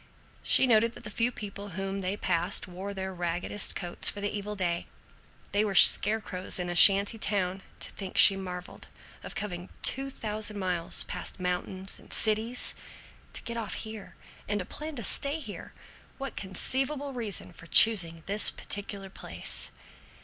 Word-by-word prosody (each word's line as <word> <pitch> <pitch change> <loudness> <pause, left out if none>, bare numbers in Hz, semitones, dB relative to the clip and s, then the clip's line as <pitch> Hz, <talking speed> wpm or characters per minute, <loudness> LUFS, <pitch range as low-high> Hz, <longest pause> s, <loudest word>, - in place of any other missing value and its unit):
She - - +4
noted 230 -1 +2
that - - -12
the 210 - -7
few 230 +3 0
people 205 -2 -8
whom 195 0 -4
they 190 +1 -3
passed 170 -1 +1
wore 185 +3 -7
their 190 -1 -6
raggedest 175 +3 0
coats 175 -1 +4
for 205 - -5
the 205 +1 -3
evil 210 +1 -5
day. 175 -3 -3 0.6
They 205 +1 +1
were 205 -2 -3
scarecrows 205 -2 +5
in 180 0 -3
a - - -5
shanty 200 +4 +5
town.... 190 -2 -2 0.2
"To - - -4
think," 190 -2 -8
she 195 - +8
marveled, 180 -2 -8 0.3
"of - - -10
coming 180 -3 -6
two 270 +1 +2
thousand 215 -4 -5
miles, 180 -3 +2
past - - -7
mountains 185 +1 -2
and - - -16
cities, 220 +3 +2 0.6
to - - -6
get 235 0 -6
off 220 -3 -4
here, 220 -2 -9 0.3
and 205 - -1
to 180 - -5
plan 305 +7 -7
to 235 - -6
stay 280 +9 +1
here! 220 -9 -9 0.5
What 275 -1 -6
conceivable 270 +9 -3
reason 220 -7 -5
for 165 - -14
choosing 170 -5 +7
this 205 +2 +3
particular 200 -1 -5
place?" - - 0
200 Hz, 165 wpm, -28 LUFS, 185-220 Hz, 0.6 s, she